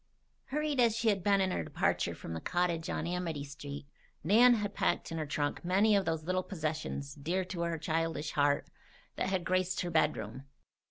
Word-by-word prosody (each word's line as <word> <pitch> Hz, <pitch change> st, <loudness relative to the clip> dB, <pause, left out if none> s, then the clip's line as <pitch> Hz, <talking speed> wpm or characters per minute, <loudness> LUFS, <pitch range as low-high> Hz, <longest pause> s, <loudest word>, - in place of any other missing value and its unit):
Hurried 300 Hz, -1 st, -1 dB
as 230 Hz, -3 st, +4 dB
she 230 Hz, -1 st, +2 dB
had 195 Hz, -4 st, +1 dB
been 195 Hz, -2 st, +3 dB
her -, -, -1 dB
departure -, -, 0 dB
from 80 Hz, -, -7 dB
the 80 Hz, -, -4 dB
cottage 175 Hz, -1 st, 0 dB
on -, -, -2 dB
Amity 170 Hz, -4 st, -2 dB
Street, 140 Hz, 0 st, -8 dB, 0.4 s
Nan 235 Hz, +8 st, +6 dB
had 205 Hz, -2 st, -2 dB
packed -, -, 0 dB
in 165 Hz, -, -3 dB
her 155 Hz, -, -3 dB
trunk 145 Hz, +2 st, -2 dB
many 200 Hz, +4 st, +4 dB
of 195 Hz, -1 st, +2 dB
those 160 Hz, -1 st, -1 dB
little 185 Hz, +3 st, 0 dB
possessions, 155 Hz, -5 st, -4 dB
dear 170 Hz, +6 st, -2 dB
to 180 Hz, -2 st, -5 dB
her 170 Hz, -1 st, -1 dB
childish 160 Hz, -1 st, -1 dB
heart, 145 Hz, 0 st, +1 dB, 0.4 s
that -, -, -1 dB
had 190 Hz, -2 st, 0 dB
graced 185 Hz, +1 st, 0 dB
her 175 Hz, -, -3 dB
bedroom. 135 Hz, -6 st, 0 dB
170 Hz, 185 wpm, -32 LUFS, 150-190 Hz, 0.4 s, Nan